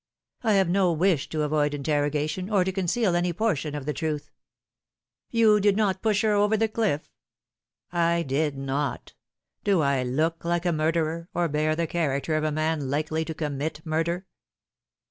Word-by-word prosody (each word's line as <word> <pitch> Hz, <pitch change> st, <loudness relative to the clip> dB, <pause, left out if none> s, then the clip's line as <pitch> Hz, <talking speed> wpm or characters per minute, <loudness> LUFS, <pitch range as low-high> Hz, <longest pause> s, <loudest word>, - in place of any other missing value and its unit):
I 220 Hz, -3 st, +2 dB
have 195 Hz, -2 st, +4 dB
no 185 Hz, 0 st, +3 dB
wish 165 Hz, -3 st, +1 dB
to 155 Hz, -1 st, -1 dB
avoid 150 Hz, -1 st, +1 dB
interrogation, 150 Hz, +5 st, -1 dB
or 200 Hz, -4 st, +3 dB
to 190 Hz, -, -1 dB
conceal 190 Hz, +1 st, 0 dB
any 175 Hz, 0 st, +1 dB
portion 160 Hz, -7 st, -1 dB
of 145 Hz, -2 st, -5 dB
the 150 Hz, -, -1 dB
truth." 155 Hz, -2 st, -3 dB, 0.5 s
" -, -, -66 dB
You 215 Hz, -2 st, +6 dB
did 205 Hz, 0 st, +3 dB
not 195 Hz, -3 st, +1 dB
push 215 Hz, -2 st, +1 dB
her 215 Hz, -1 st, +3 dB
over 205 Hz, +1 st, +3 dB
the 225 Hz, +1 st, +2 dB
cliff 215 Hz, -8 st, -1 dB, 0.3 s
?" -, -, -67 dB
" -, -, -52 dB, 0.2 s
I 170 Hz, 0 st, +1 dB
did 145 Hz, +1 st, -1 dB
not. 135 Hz, +1 st, -3 dB, 0.5 s
Do 195 Hz, -5 st, +3 dB
I 140 Hz, -2 st, +2 dB
look 155 Hz, +7 st, -1 dB
like 175 Hz, +1 st, -1 dB
a 175 Hz, -, +2 dB
murderer, 165 Hz, +2 st, -1 dB
or 175 Hz, -1 st, +2 dB
bear 155 Hz, +1 st, 0 dB
the 170 Hz, +1 st, 0 dB
character 155 Hz, -2 st, -1 dB
of 155 Hz, -, 0 dB
a 155 Hz, -, 0 dB
man 155 Hz, -2 st, -1 dB
likely 155 Hz, +3 st, -1 dB
to 160 Hz, -, -5 dB
commit 150 Hz, 0 st, -3 dB
murder 165 Hz, +3 st, -1 dB
160 Hz, 185 wpm, -26 LUFS, 150-185 Hz, 0.5 s, You